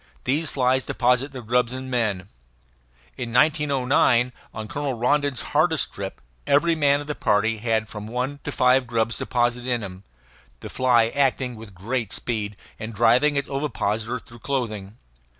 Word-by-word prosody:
These 145 Hz, +4 st, 0 dB
flies 130 Hz, -1 st, +2 dB
deposit 125 Hz, +4 st, +1 dB
their 130 Hz, -3 st, -8 dB
grubs 125 Hz, +2 st, +1 dB
in 130 Hz, 0 st, -6 dB
men. 110 Hz, -7 st, -1 dB, 0.9 s
In 115 Hz, -, -4 dB
1909, 130 Hz, -3 st, +3 dB, 0.2 s
on 110 Hz, 0 st, -6 dB
Colonel 140 Hz, +2 st, -3 dB
Rondon's 140 Hz, +2 st, +1 dB
hardest 155 Hz, -1 st, +2 dB
trip, 95 Hz, -1 st, -6 dB, 0.3 s
every 165 Hz, +4 st, +4 dB
man 145 Hz, -2 st, +3 dB
of -, -, -7 dB
the 150 Hz, -, -3 dB
party 110 Hz, -3 st, +1 dB
had 110 Hz, -1 st, 0 dB
from 105 Hz, 0 st, -8 dB
one 125 Hz, +5 st, -3 dB
to 145 Hz, -, -4 dB
five 125 Hz, -1 st, +3 dB
grubs 115 Hz, -1 st, 0 dB
deposited 120 Hz, 0 st, 0 dB
in 120 Hz, -3 st, 0 dB
him, 95 Hz, -1 st, -8 dB, 0.6 s
the -, -, -8 dB
fly 120 Hz, -3 st, +3 dB
acting 130 Hz, -2 st, 0 dB
with 110 Hz, -3 st, -12 dB
great 110 Hz, +3 st, -3 dB
speed, 105 Hz, -4 st, -3 dB, 0.2 s
and 110 Hz, 0 st, -6 dB
driving 120 Hz, +7 st, +4 dB
its 140 Hz, -1 st, 0 dB
ovipositor 115 Hz, -4 st, -2 dB
through 115 Hz, 0 st, -14 dB
clothing. 110 Hz, -6 st, -3 dB
125 Hz, 155 wpm, -24 LUFS, 115-135 Hz, 0.9 s, every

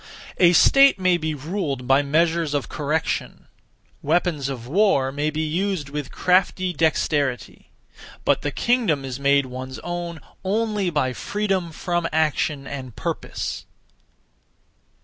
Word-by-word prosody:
A 175 Hz, -1 st, +6 dB
state 275 Hz, +10 st, +6 dB
may 185 Hz, -1 st, +3 dB
be 160 Hz, -2 st, -3 dB
ruled 145 Hz, -3 st, -3 dB
by 135 Hz, +2 st, +5 dB
(measures 160 Hz, +1 st, +1 dB
of) 140 Hz, -, -1 dB
correction; 155 Hz, +1 st, -2 dB, 0.6 s
weapons 155 Hz, -3 st, 0 dB
of 125 Hz, -4 st, -6 dB
war 150 Hz, -5 st, +2 dB
may 145 Hz, +2 st, -1 dB
be 155 Hz, +1 st, -2 dB
used 170 Hz, -1 st, -2 dB
with 145 Hz, -1 st, -5 dB
crafty 185 Hz, 0 st, +1 dB
dexterity; 145 Hz, -5 st, -1 dB, 0.6 s
(but) -, -, +3 dB
the -, -, -1 dB
kingdom 210 Hz, -, +1 dB
is 130 Hz, 0 st, -5 dB
made 140 Hz, 0 st, +3 dB
one's 130 Hz, +1 st, -7 dB
own 175 Hz, -1 st, -4 dB, 0.2 s
(only) 210 Hz, -1 st, 0 dB
by 145 Hz, -6 st, 0 dB
freedom 190 Hz, -, -2 dB
from 175 Hz, +1 st, -2 dB
action 150 Hz, -2 st, 0 dB
and 130 Hz, -5 st, -7 dB
purpose. -, -, -4 dB
155 Hz, 130 wpm, -23 LUFS, 140-180 Hz, 0.6 s, A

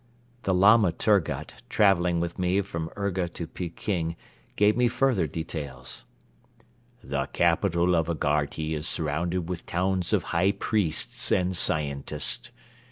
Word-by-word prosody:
The 95 Hz, -, 0 dB
Lama 100 Hz, +1 st, +6 dB
Turgut 100 Hz, +1 st, 0 dB, 0.2 s
traveling 90 Hz, -4 st, +3 dB
with 85 Hz, +2 st, -3 dB
me 90 Hz, +2 st, +2 dB
from 85 Hz, -4 st, -5 dB
Urga 95 Hz, -3 st, -1 dB
to 85 Hz, -, -6 dB
Peking 85 Hz, 0 st, -3 dB, 0.4 s
gave 105 Hz, +1 st, +4 dB
me 125 Hz, +1 st, +3 dB
further 120 Hz, -8 st, +1 dB
details. 70 Hz, -5 st, -5 dB, 1.0 s
"The 70 Hz, 0 st, -2 dB
capital 85 Hz, +1 st, +2 dB
of 80 Hz, -1 st, +1 dB
Agharti 75 Hz, 0 st, -1 dB
is 75 Hz, +1 st, -2 dB
surrounded 85 Hz, +3 st, -1 dB
with 90 Hz, -2 st, -5 dB
towns 90 Hz, 0 st, 0 dB
of -, -, +2 dB
high 90 Hz, +4 st, +3 dB
priests 100 Hz, -9 st, 0 dB
and 90 Hz, 0 st, +2 dB
scientists. 70 Hz, -5 st, 0 dB
85 Hz, 125 wpm, -26 LUFS, 80-95 Hz, 1.0 s, Lama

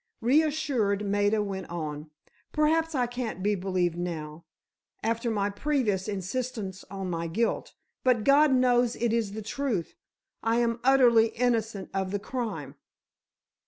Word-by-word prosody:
Reassured, 265 Hz, -6 st, +2 dB
Maida 205 Hz, +1 st, +2 dB
went 190 Hz, -3 st, -5 dB
on. 155 Hz, -2 st, -5 dB, 0.4 s
"Perhaps 320 Hz, +1 st, +2 dB
I 250 Hz, -2 st, +2 dB
can't 240 Hz, -6 st, -4 dB
be 210 Hz, +1 st, +2 dB
believed 180 Hz, -3 st, 0 dB
now, 165 Hz, -2 st, -5 dB, 0.6 s
after 230 Hz, +1 st, 0 dB
my 205 Hz, -2 st, 0 dB
previous 215 Hz, -6 st, 0 dB
insistence 200 Hz, 0 st, -4 dB
on 195 Hz, -1 st, -5 dB
my 165 Hz, 0 st, -2 dB
guilt, 225 Hz, +8 st, -1 dB, 0.3 s
but 250 Hz, -4 st, +3 dB
God 285 Hz, +3 st, +5 dB
knows 245 Hz, -2 st, +3 dB
it 235 Hz, -1 st, 0 dB
is 225 Hz, -4 st, 0 dB
the 220 Hz, 0 st, -5 dB
truth; 225 Hz, -, -2 dB, 0.5 s
I 225 Hz, +1 st, +1 dB
am 235 Hz, -1 st, +1 dB
utterly 245 Hz, -4 st, +6 dB
innocent 225 Hz, -4 st, -1 dB
of 190 Hz, -1 st, -1 dB
the 205 Hz, -, -1 dB
crime." 200 Hz, -, -4 dB
220 Hz, 135 wpm, -28 LUFS, 190-250 Hz, 0.6 s, utterly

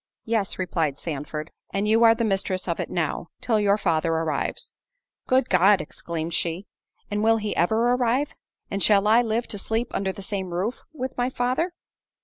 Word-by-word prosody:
"Yes," 220 Hz, -4 st, -1 dB
replied 165 Hz, -6 st, -1 dB
Sandford, 150 Hz, 0 st, -5 dB, 0.2 s
"and 200 Hz, +1 st, -1 dB
you 225 Hz, +2 st, +4 dB
are 225 Hz, 0 st, +7 dB
the 230 Hz, -, -1 dB
mistress 195 Hz, -3 st, -1 dB
of 170 Hz, -, -1 dB
it -, -, -3 dB
now, 170 Hz, 0 st, -2 dB
till 225 Hz, -3 st, +1 dB
your 205 Hz, 0 st, +3 dB
father 165 Hz, -4 st, +1 dB
arrives." 160 Hz, -3 st, -2 dB, 0.5 s
"Good 255 Hz, 0 st, +3 dB
God!" 190 Hz, +2 st, +5 dB
exclaimed 165 Hz, +1 st, -5 dB
she, 170 Hz, +3 st, -1 dB, 0.5 s
"and 205 Hz, +1 st, 0 dB
will 225 Hz, 0 st, +4 dB
he 210 Hz, -1 st, -3 dB
ever 220 Hz, +8 st, +2 dB
arrive? 250 Hz, +4 st, +1 dB, 0.4 s
and 200 Hz, -, -2 dB
shall 205 Hz, -1 st, +5 dB
I 225 Hz, +3 st, +6 dB
live 230 Hz, 0 st, -1 dB
to 205 Hz, -, -3 dB
sleep 225 Hz, +4 st, -2 dB
under 190 Hz, -1 st, 0 dB
the 195 Hz, -, -9 dB
same 190 Hz, -3 st, -4 dB
roof 205 Hz, +8 st, -1 dB
with 260 Hz, -4 st, -5 dB
my 245 Hz, +1 st, +1 dB
father?" 260 Hz, +8 st, -1 dB
205 Hz, 180 wpm, -25 LUFS, 175-230 Hz, 0.5 s, are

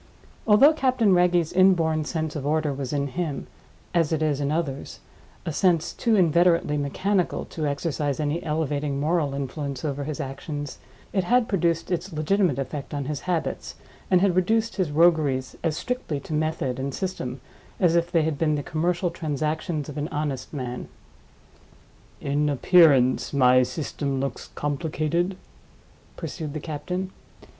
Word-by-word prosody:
Although 230 Hz, +9 st, +7 dB
Captain 255 Hz, -8 st, +2 dB
Wragge's 175 Hz, -2 st, +3 dB
inborn 165 Hz, -4 st, +3 dB
sense 160 Hz, -1 st, -3 dB
of 150 Hz, -, -3 dB
order 150 Hz, 0 st, +1 dB
was 135 Hz, -2 st, -4 dB
in 140 Hz, -1 st, 0 dB
him—as 165 Hz, +1 st, -3 dB
it 160 Hz, -1 st, +1 dB
is 145 Hz, -2 st, 0 dB
in 140 Hz, 0 st, 0 dB
others—a 155 Hz, 0 st, -5 dB
sense 175 Hz, -1 st, +2 dB
too 230 Hz, -2 st, +1 dB
inveterately 170 Hz, -3 st, +3 dB
mechanical 180 Hz, +7 st, 0 dB
to 155 Hz, -2 st, -3 dB
exercise 145 Hz, -1 st, -1 dB
any 150 Hz, +2 st, -1 dB
elevating 150 Hz, -2 st, -1 dB
moral 150 Hz, -2 st, +1 dB
influence 140 Hz, 0 st, -4 dB
over 140 Hz, -1 st, -2 dB
his 150 Hz, 0 st, -4 dB
actions, 145 Hz, +1 st, -5 dB, 0.3 s
it 190 Hz, -3 st, +1 dB
had 245 Hz, +3 st, +3 dB
produced 170 Hz, -3 st, 0 dB
its 175 Hz, +2 st, -2 dB
legitimate 160 Hz, 0 st, +1 dB
effect 140 Hz, +1 st, -4 dB
on 140 Hz, -1 st, -2 dB
his 145 Hz, 0 st, -3 dB
habits, 170 Hz, -3 st, -2 dB, 0.3 s
and 185 Hz, -1 st, +4 dB
had 190 Hz, -3 st, +3 dB
reduced 220 Hz, +5 st, +1 dB
his 185 Hz, -5 st, +1 dB
rogueries 150 Hz, -5 st, +2 dB
as 160 Hz, -2 st, 0 dB
strictly 250 Hz, -, -3 dB
to 155 Hz, -, -7 dB
method 150 Hz, -5 st, -1 dB
and 135 Hz, 0 st, -3 dB
system 135 Hz, -9 st, -4 dB, 0.4 s
as 175 Hz, -3 st, +3 dB
if 170 Hz, 0 st, +1 dB
they 165 Hz, -3 st, +3 dB
had 155 Hz, -2 st, -2 dB
been 155 Hz, -2 st, +2 dB
the 145 Hz, -, -3 dB
commercial 175 Hz, +3 st, 0 dB
transactions 155 Hz, -1 st, -2 dB
of 150 Hz, 0 st, -5 dB
an 145 Hz, -, -2 dB
honest 145 Hz, -4 st, -3 dB
man. 125 Hz, -4 st, -5 dB, 1.3 s
"In 145 Hz, +1 st, 0 dB
appearance, 140 Hz, -4 st, +4 dB
my 130 Hz, -2 st, +5 dB
system 135 Hz, +1 st, -2 dB
looks 135 Hz, +1 st, -4 dB
complicated?" 155 Hz, +4 st, -1 dB, 0.8 s
pursued 155 Hz, -4 st, -5 dB
the -, -, -2 dB
captain. 180 Hz, +5 st, -4 dB
155 Hz, 150 wpm, -25 LUFS, 145-175 Hz, 1.3 s, Although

